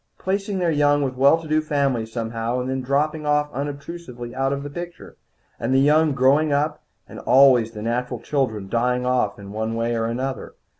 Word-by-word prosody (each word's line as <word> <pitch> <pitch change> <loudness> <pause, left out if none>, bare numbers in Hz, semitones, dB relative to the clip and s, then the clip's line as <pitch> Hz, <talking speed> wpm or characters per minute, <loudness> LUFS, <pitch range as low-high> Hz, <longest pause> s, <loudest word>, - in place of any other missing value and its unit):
Placing 195 +1 -2
their 175 -2 +1
young 145 -1 +3
with 130 -2 -2
well 140 +5 +5
to 165 - -10
do 155 0 +2
families 135 -7 -1
somehow, 115 +1 -2
and 125 +1 -3
then 130 0 -2
dropping 150 +4 -1
unobtrusively 145 -3 -3
out 135 +1 0
of 140 0 -3
the 145 - -6
picture. 175 +2 -8 0.4
And 130 +3 0
the - - +5
young 150 +2 +4
growing 140 +4 +3
up, 150 +2 0 0.3
and - - -10
always 125 -3 +5
the 105 -1 -7
natural 125 +1 -2
children 110 -7 -2
dying 125 +3 0
off 125 -5 +1
in 100 -1 -10
one 110 +2 -3
way 115 +1 -1
or 115 0 -1
another. 130 +3 -4
135 Hz, 190 wpm, -22 LUFS, 120-150 Hz, 0.4 s, well